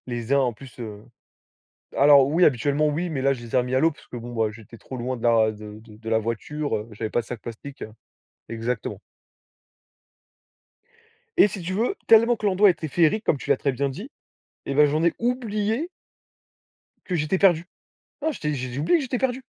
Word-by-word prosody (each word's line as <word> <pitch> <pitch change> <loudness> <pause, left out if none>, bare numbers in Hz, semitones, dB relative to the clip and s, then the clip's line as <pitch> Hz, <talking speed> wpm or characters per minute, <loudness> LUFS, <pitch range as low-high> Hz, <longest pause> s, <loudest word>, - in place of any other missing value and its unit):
Les 120 +1 -3
uns 140 - +5
en 125 -3 +1
plus, 130 +2 -14
heu 105 -2 -8 0.9
alors 140 -1 +6
oui, 165 +5 +4
habituellement 145 +3 +2
oui, 165 +4 -2
mais 145 -4 -2
là 135 +1 +2
je 120 - -10
les 115 - -10
ai - - +5
remis 125 +1 -1
à 130 - +4
l'eau 165 - +4
parce 150 - -16
que - - -9
bon 120 +1 -7
bah, 110 -2 +1
j'étais 110 +1 -13
trop 130 - -9
loin 125 +1 -3
de - - -12
la 115 -2 +4
de 105 0 -10
de 110 0 -12
la 110 0 +3
voiture, 115 +6 -3
heu, 110 +1 -3
j'avais 110 +1 -4
pas - - +1
de 115 - -10
sac 120 -3 -7
plastique. 125 +4 -8 0.6
Exactement. 115 0 -4 2.4
Et - - +7
si 200 -1 -7
tu 175 +2 -4
veux, 230 - 0
tellement 230 +2 +6
que 215 - -6
l'endroit 200 +1 +5
était 170 -3 -1
féerique 170 - +2
comme 150 - +1
tu - - -9
l'as - - +4
très 140 - 0
bien 140 +2 -1
dit, 200 - -8 0.6
eh 140 - -2
ben 150 +1 +6
j'en 155 +3 0
ai 170 - +3
oublié 235 +3 -1 1.2
que 180 - -2
j'étais 155 +3 0
perdu. 175 -4 +4 0.6
Non 315 +1 0
j'étais 150 - -3
j'ai 130 -2 -4
j'ai 130 - -3
oublié 250 - +3
que - - -3
j'étais 250 -1 -2
perdu. 260 0 -1
140 Hz, 210 wpm, -24 LUFS, 120-180 Hz, 2.4 s, Et